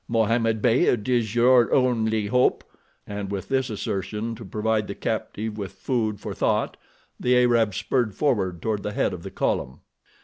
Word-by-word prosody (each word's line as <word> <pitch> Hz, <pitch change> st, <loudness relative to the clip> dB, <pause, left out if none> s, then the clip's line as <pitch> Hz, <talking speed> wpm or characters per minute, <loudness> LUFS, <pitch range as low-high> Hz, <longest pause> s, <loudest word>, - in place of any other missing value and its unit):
Mohammed 115 Hz, -1 st, +1 dB
Beyd 120 Hz, -2 st, +3 dB
is 120 Hz, -3 st, +1 dB
your 120 Hz, 0 st, +5 dB
only 110 Hz, -4 st, +2 dB
hope," 125 Hz, +5 st, +2 dB, 0.4 s
and 100 Hz, -1 st, -5 dB
with 100 Hz, -1 st, -5 dB
this 130 Hz, -1 st, 0 dB
assertion 105 Hz, +2 st, -3 dB
to 115 Hz, -, -9 dB
provide 105 Hz, +2 st, -1 dB
the -, -, -5 dB
captive 110 Hz, 0 st, -3 dB
with 100 Hz, -1 st, -5 dB
food 110 Hz, 0 st, -2 dB
for -, -, -5 dB
thought, -, -, 0 dB, 0.4 s
the 125 Hz, 0 st, +3 dB
Arab 115 Hz, -5 st, +3 dB
spurred 120 Hz, -7 st, 0 dB
forward 95 Hz, -, 0 dB
toward 110 Hz, -2 st, -1 dB
the 105 Hz, -, -4 dB
head -, -, 0 dB
of -, -, -6 dB
the -, -, -7 dB
column. 65 Hz, -, -2 dB
110 Hz, 165 wpm, -24 LUFS, 105-120 Hz, 0.4 s, your